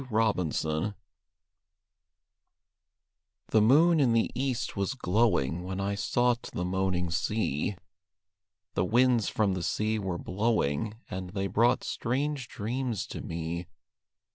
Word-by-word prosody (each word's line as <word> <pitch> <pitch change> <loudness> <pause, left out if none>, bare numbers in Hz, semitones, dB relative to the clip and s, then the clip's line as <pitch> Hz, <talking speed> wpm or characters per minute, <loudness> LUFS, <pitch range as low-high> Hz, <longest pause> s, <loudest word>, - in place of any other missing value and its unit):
THE 135 - -9 0.3
MERMAID 80 +3 -1 2.5
The 110 - +4
moon 155 +9 +5
in 130 -5 +4
the 115 -1 +2
east 130 -2 -2
was 100 +6 -1
glowing 90 - +1
When 95 +1 -4
I 100 +1 -1
sought 120 +4 +1
the 90 - -1
moaning 90 -2 0
sea; 100 -1 -1 1.0
The - - +1
winds 120 +2 +3
from 105 -3 +1
the 90 - -3
sea 110 +4 0
were 95 -4 -2
blowing, 105 -1 0
And 90 0 -5
they 95 +1 -2
brought 115 +6 +2
strange 135 +1 -2
dreams 115 0 -3
to - - -6
me. 85 +1 -4
105 Hz, 120 wpm, -29 LUFS, 90-120 Hz, 2.5 s, moon